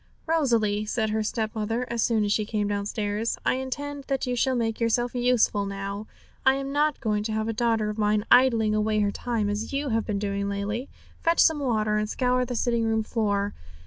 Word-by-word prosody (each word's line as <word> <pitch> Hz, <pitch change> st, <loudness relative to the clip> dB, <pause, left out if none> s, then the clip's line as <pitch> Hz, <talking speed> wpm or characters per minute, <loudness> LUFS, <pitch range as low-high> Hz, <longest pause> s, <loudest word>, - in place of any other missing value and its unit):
'Rosalie,' 230 Hz, -10 st, +1 dB
said 220 Hz, 0 st, -1 dB
her 220 Hz, 0 st, 0 dB
stepmother, 220 Hz, +2 st, -2 dB
as 235 Hz, -1 st, -2 dB
soon 220 Hz, -2 st, +2 dB
as 205 Hz, -, -1 dB
she 215 Hz, -, +1 dB
came 210 Hz, -1 st, -1 dB
downstairs, 205 Hz, +2 st, -2 dB
'I -, -, +3 dB
intend 280 Hz, +2 st, -4 dB
that 270 Hz, -1 st, -1 dB
you 250 Hz, -1 st, -1 dB
shall 260 Hz, +2 st, +1 dB
make 225 Hz, -2 st, -1 dB
yourself 240 Hz, +1 st, +1 dB
useful 240 Hz, -5 st, +2 dB
now. 200 Hz, +2 st, -5 dB, 0.4 s
I'm 270 Hz, +1 st, +2 dB
not 295 Hz, 0 st, +1 dB
going 215 Hz, -4 st, 0 dB
to 220 Hz, -, -2 dB
have 220 Hz, 0 st, -1 dB
a 225 Hz, -, -1 dB
daughter 225 Hz, -2 st, +1 dB
of 210 Hz, +1 st, -4 dB
mine 210 Hz, 0 st, +2 dB
idling 230 Hz, -4 st, +5 dB
away 215 Hz, 0 st, +1 dB
her 205 Hz, -1 st, +1 dB
time 230 Hz, -1 st, -2 dB
as 210 Hz, +5 st, -3 dB
you 280 Hz, 0 st, -1 dB
have 225 Hz, -1 st, 0 dB
been 210 Hz, -, -1 dB
doing 200 Hz, 0 st, -2 dB
lately. 205 Hz, +6 st, -3 dB, 0.3 s
Fetch 335 Hz, +1 st, +2 dB
some 320 Hz, -2 st, +5 dB
water 215 Hz, -6 st, +1 dB
and 210 Hz, 0 st, -1 dB
scour 250 Hz, +1 st, +1 dB
the 245 Hz, 0 st, -4 dB
sitting 235 Hz, 0 st, +1 dB
room 220 Hz, -1 st, +1 dB
floor. 205 Hz, -3 st, -1 dB
220 Hz, 205 wpm, -26 LUFS, 210-250 Hz, 0.4 s, idling